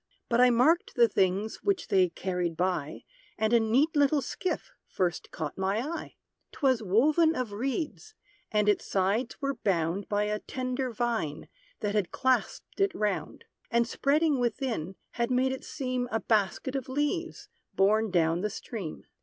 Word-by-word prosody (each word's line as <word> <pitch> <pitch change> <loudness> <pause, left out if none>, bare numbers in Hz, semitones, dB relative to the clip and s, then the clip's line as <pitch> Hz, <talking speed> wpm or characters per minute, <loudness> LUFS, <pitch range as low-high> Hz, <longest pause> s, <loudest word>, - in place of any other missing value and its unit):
But 235 0 +3
I 250 - +7
marked 260 +9 +3
the 235 -1 +6
things 195 +1 0
which 400 -2 -1
they 185 -2 +4
carried 175 -1 -3
by; 175 -5 -1 0.3
And 220 +1 +1
a 235 - +7
neat 260 +9 +2
little 285 -1 +3
skiff 365 +8 -3 0.2
first 180 -2 -2
caught 155 +2 -5
my 190 +2 +1
eye. 300 +9 -4 0.4
'Twas 260 -5 +1
woven 300 - +3
of 250 -4 -2
reeds, 280 - -3 0.4
and 210 -1 +2
its 205 - +3
sides 200 +6 0
were 275 0 0
bound 190 -4 -1
By 205 0 +1
a 210 0 -1
tender 255 +2 -3
vine, 225 -10 -2 0.3
that 205 -1 -1
had 205 -4 +1
clasped 260 +8 -1
it 395 -1 +2
round; 210 -2 -2 0.2
And 235 0 +2
spreading 290 +3 +2
within, 235 - -2 0.2
had 235 0 -1
made 255 +1 +2
it 265 - -5
seem 255 -2 -3
A 225 - +1
basket 220 +5 0
of 265 -1 -3
leaves, 295 +6 -2 0.3
borne 215 +3 +3
down 170 -1 +2
the 210 - 0
stream. 205 -5 -7
230 Hz, 160 wpm, -29 LUFS, 195-265 Hz, 0.4 s, I